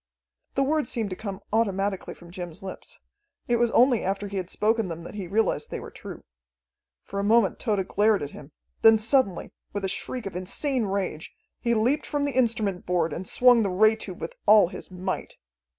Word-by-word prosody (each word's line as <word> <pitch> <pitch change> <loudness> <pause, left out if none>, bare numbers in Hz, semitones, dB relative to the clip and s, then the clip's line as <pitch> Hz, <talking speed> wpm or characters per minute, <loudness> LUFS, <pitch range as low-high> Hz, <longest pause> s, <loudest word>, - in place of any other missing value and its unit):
The 275 - +3
words 295 -2 0
seemed 220 -4 -2
to - - -3
come 200 -1 -6
automatically 200 -3 0
from 175 -1 -15
Jim's 175 +1 -7
lips. 190 - -9 0.5
It 240 - +2
was 240 0 +2
only 245 0 +4
after 195 +2 -2
he 200 0 -5
had 185 -1 -3
spoken 220 0 +1
them 165 -1 -6
that - - -9
he 200 -3 -5
realized 220 +5 0
they - - -4
were - - -9
true. - - -10 0.8
For 200 - -5
a - - -1
moment 220 -1 +3
Tode 205 -5 0
glared 210 -2 +2
at 145 - -5
him; 145 +1 -12 0.3
then 225 0 +7
suddenly, 220 -4 +1 0.2
with 200 -1 -2
a - - +1
shriek 240 +5 -4
of 195 - -6
insane 235 +7 -1
rage, 190 -5 -3 0.3
he 235 -1 +1
leaped 245 +7 +1
from 290 -1 -1
the 285 -3 -2
instrument 220 -7 +1
board 170 -3 +1
and 180 +4 -5
swung 245 -2 +5
the 200 - +1
ray 215 +4 +4
tube 190 -5 -7
with - - -5
all 210 -4 +7
his - - -9
might. 185 +1 -4
205 Hz, 200 wpm, -26 LUFS, 185-230 Hz, 0.8 s, then